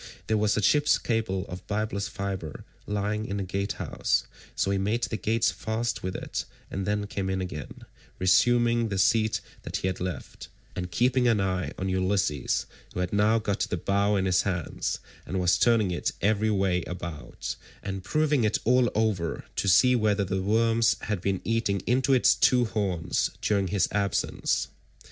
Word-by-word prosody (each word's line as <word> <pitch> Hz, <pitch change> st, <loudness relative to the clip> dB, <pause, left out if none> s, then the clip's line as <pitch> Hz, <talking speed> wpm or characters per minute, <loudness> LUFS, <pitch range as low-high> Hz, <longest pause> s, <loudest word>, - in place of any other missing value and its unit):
There 110 Hz, -, +1 dB
was 105 Hz, 0 st, +2 dB
a 105 Hz, -, 0 dB
ship's 150 Hz, +7 st, +4 dB
cable 110 Hz, -5 st, -1 dB
of 90 Hz, 0 st, -8 dB
byblus 105 Hz, -1 st, -2 dB
fibre 95 Hz, -6 st, -5 dB, 0.2 s
lying 105 Hz, +1 st, -1 dB
in 100 Hz, -, -3 dB
the 100 Hz, -, -2 dB
gatehouse, 100 Hz, +2 st, -1 dB, 0.3 s
so 100 Hz, -, 0 dB
he 100 Hz, -, +1 dB
made 110 Hz, +5 st, 0 dB
the -, -, -1 dB
gates 110 Hz, +1 st, +1 dB
fast 110 Hz, +1 st, -2 dB
with 95 Hz, 0 st, -4 dB
it -, -, -4 dB, 0.3 s
and 95 Hz, 0 st, -3 dB
then 105 Hz, 0 st, 0 dB
came 100 Hz, -2 st, -3 dB
in 95 Hz, 0 st, -1 dB
again, 90 Hz, -6 st, -6 dB, 0.3 s
resuming 120 Hz, +5 st, +3 dB
the 95 Hz, -, -2 dB
seat 110 Hz, +3 st, +2 dB, 0.2 s
that -, -, -6 dB
he -, -, -2 dB
had 95 Hz, -1 st, -2 dB
left, 90 Hz, -2 st, -6 dB, 0.3 s
and 90 Hz, 0 st, -4 dB
keeping 125 Hz, +5 st, +2 dB
an 115 Hz, -3 st, +3 dB
eye 95 Hz, -2 st, -1 dB
on 95 Hz, -, -2 dB
Ulysses, 95 Hz, -6 st, 0 dB, 0.3 s
who -, -, -2 dB
had 90 Hz, +1 st, -2 dB
now 105 Hz, +2 st, +4 dB
got 105 Hz, -2 st, -1 dB
the 90 Hz, -, -1 dB
bow 100 Hz, +4 st, +1 dB
in 95 Hz, -1 st, +1 dB
his 90 Hz, -1 st, +3 dB
hands, 85 Hz, -5 st, -2 dB, 0.3 s
and 95 Hz, -, -2 dB
was 90 Hz, 0 st, +3 dB
turning 115 Hz, -5 st, +3 dB
it 85 Hz, -, -1 dB
every 110 Hz, +2 st, +2 dB
way 95 Hz, -3 st, +1 dB
about, 85 Hz, -4 st, -6 dB, 0.3 s
and 95 Hz, -1 st, -4 dB
proving 150 Hz, +3 st, +1 dB
it 110 Hz, 0 st, +2 dB
all 125 Hz, 0 st, +4 dB
over 105 Hz, -7 st, 0 dB
to -, -, -1 dB
see 125 Hz, +8 st, +6 dB
whether 105 Hz, -3 st, +2 dB
the 95 Hz, 0 st, -2 dB
worms 115 Hz, +3 st, +3 dB
had 105 Hz, -5 st, -2 dB
been 95 Hz, -1 st, -1 dB
eating 110 Hz, -3 st, 0 dB
into 130 Hz, +2 st, +2 dB
its 130 Hz, -2 st, +5 dB
two 125 Hz, -1 st, +4 dB
horns 95 Hz, -7 st, -1 dB
during 100 Hz, -2 st, +1 dB
his 100 Hz, +1 st, +1 dB
absence. 100 Hz, -1 st, 0 dB
100 Hz, 175 wpm, -27 LUFS, 95-110 Hz, 0.3 s, see